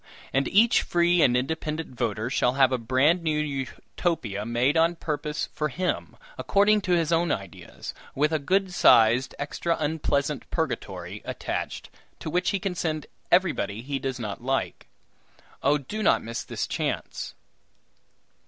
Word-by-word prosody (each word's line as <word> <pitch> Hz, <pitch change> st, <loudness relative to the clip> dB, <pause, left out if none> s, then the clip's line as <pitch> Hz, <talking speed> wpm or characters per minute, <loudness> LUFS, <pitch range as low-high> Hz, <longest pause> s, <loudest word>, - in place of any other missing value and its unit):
And 135 Hz, +1 st, +2 dB
each 225 Hz, +4 st, +5 dB
free 175 Hz, 0 st, +3 dB
and 125 Hz, -3 st, +5 dB
independent 155 Hz, +3 st, -3 dB
voter 115 Hz, 0 st, -2 dB
shall 125 Hz, -1 st, +2 dB
have 135 Hz, -1 st, +4 dB
a 130 Hz, -, 0 dB
bran 130 Hz, +9 st, +3 dB
new 155 Hz, -2 st, 0 dB
Utopia 135 Hz, -, -3 dB
made 120 Hz, +5 st, +2 dB
on 165 Hz, +1 st, +3 dB
purpose 150 Hz, -2 st, -3 dB
for 150 Hz, 0 st, -1 dB
him, 180 Hz, +6 st, -2 dB, 0.2 s
according 205 Hz, +1 st, +3 dB
to 185 Hz, -2 st, 0 dB
his 165 Hz, -2 st, +2 dB
own 170 Hz, -1 st, +2 dB
ideas, 95 Hz, -4 st, -6 dB, 0.2 s
with 150 Hz, +3 st, +2 dB
a 155 Hz, -, +2 dB
good 190 Hz, +5 st, +1 dB
sized, 120 Hz, -5 st, +5 dB
extra 165 Hz, +3 st, -2 dB
unpleasant 145 Hz, -3 st, -1 dB
purgatory -, -, -3 dB
attached, -, -, -4 dB, 0.3 s
to 155 Hz, -, -6 dB
which 180 Hz, +2 st, +1 dB
he 200 Hz, -, +1 dB
can 190 Hz, 0 st, -2 dB
send 155 Hz, -3 st, -2 dB, 0.3 s
everybody 120 Hz, -, +2 dB
he 140 Hz, +1 st, -3 dB
does 135 Hz, -2 st, -3 dB
not 105 Hz, -3 st, -5 dB
like. 135 Hz, +2 st, -2 dB, 0.7 s
Oh! 145 Hz, +2 st, +3 dB
do 180 Hz, +10 st, -6 dB
not -, -, +3 dB
miss 115 Hz, +1 st, -4 dB
this -, -, -3 dB
chance!" -, -, -3 dB
150 Hz, 150 wpm, -26 LUFS, 130-170 Hz, 0.7 s, each